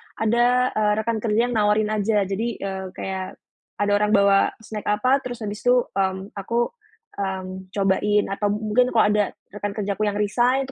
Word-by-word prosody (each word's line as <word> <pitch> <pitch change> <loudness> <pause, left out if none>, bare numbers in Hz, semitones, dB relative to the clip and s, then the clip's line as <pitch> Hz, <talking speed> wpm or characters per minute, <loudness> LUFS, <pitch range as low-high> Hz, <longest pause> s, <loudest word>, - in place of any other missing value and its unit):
ada, 240 +3 +2
eee, 210 -1 +1
rekan 230 -1 -1
kerja 230 +3 +1
nawarin 210 -1 +2
aja 210 -1 +1
jadi, 195 +4 -2 0.2
eee, 190 -1 -4
kayak 190 -1 -5 0.4
ada 205 0 0
orang 210 +1 +3
bawa 200 0 +4
snack 215 -1 -7
apa 255 +7 +2
terus 245 -3 -6
habis 210 0 -4
itu, 245 0 +3 0.2
mmm, 190 0 -2
aku, 235 +4 -1 0.5
mmm, 190 -1 -4
cobain 205 +1 +2
atau 205 +1 -1
mungkin 220 +4 +2
kalau 220 - +6
ada 210 0 +3 0.3
rekan 205 0 -5
kerjaku 210 0 -1
yang 205 - -1
resign 240 +6 +2
itu 270 - -9
210 Hz, 170 wpm, -23 LUFS, 200-230 Hz, 0.5 s, kalau